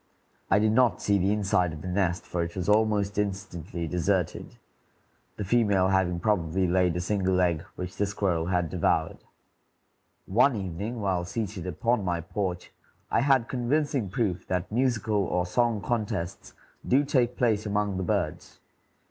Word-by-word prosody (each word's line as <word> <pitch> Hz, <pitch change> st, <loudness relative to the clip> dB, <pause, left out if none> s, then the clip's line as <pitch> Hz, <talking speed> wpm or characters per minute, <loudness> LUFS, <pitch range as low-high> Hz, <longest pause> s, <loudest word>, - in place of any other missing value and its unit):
I 95 Hz, -, +5 dB
did 105 Hz, +1 st, +3 dB
not 115 Hz, -5 st, +3 dB
see 100 Hz, -1 st, +2 dB
the 95 Hz, +2 st, +2 dB
inside 95 Hz, -5 st, +1 dB
of 75 Hz, -, -9 dB
the -, -, -5 dB
nest, 90 Hz, -2 st, 0 dB
for 90 Hz, -, -2 dB
it 85 Hz, 0 st, -4 dB
was 90 Hz, -2 st, -3 dB
almost 105 Hz, -1 st, +2 dB
instantly 95 Hz, -4 st, -3 dB
deserted, 90 Hz, +1 st, -1 dB, 0.8 s
the 105 Hz, -, -3 dB
female 100 Hz, -3 st, +2 dB
having 95 Hz, -2 st, +1 dB
probably 95 Hz, -2 st, +1 dB
laid 90 Hz, -1 st, +2 dB
a -, -, -1 dB
single 95 Hz, 0 st, 0 dB
egg, 85 Hz, -3 st, +2 dB
which 90 Hz, 0 st, -6 dB
the 105 Hz, -, +1 dB
squirrel 95 Hz, -4 st, -1 dB
had 90 Hz, -3 st, 0 dB
devoured. 80 Hz, -2 st, 0 dB, 1.1 s
One 125 Hz, +6 st, +3 dB
evening, 100 Hz, +4 st, -4 dB
while 95 Hz, -3 st, 0 dB
seated 95 Hz, -1 st, -4 dB
upon 115 Hz, +6 st, 0 dB
my 90 Hz, -2 st, -1 dB
porch, 90 Hz, +1 st, -4 dB, 0.4 s
I -, -, +3 dB
had 135 Hz, -3 st, +3 dB
convincing 130 Hz, -2 st, 0 dB
proof 95 Hz, -3 st, -2 dB
that 90 Hz, +1 st, -2 dB
musical 115 Hz, -3 st, +1 dB
or 90 Hz, -1 st, 0 dB
song 115 Hz, +2 st, +1 dB
contests 100 Hz, -5 st, -3 dB, 0.3 s
do 135 Hz, +3 st, +4 dB
take 125 Hz, -4 st, +1 dB
place 110 Hz, -4 st, +1 dB
among 105 Hz, -1 st, 0 dB
the 95 Hz, -, -2 dB
birds. -, -, -2 dB
95 Hz, 155 wpm, -27 LUFS, 90-110 Hz, 1.1 s, I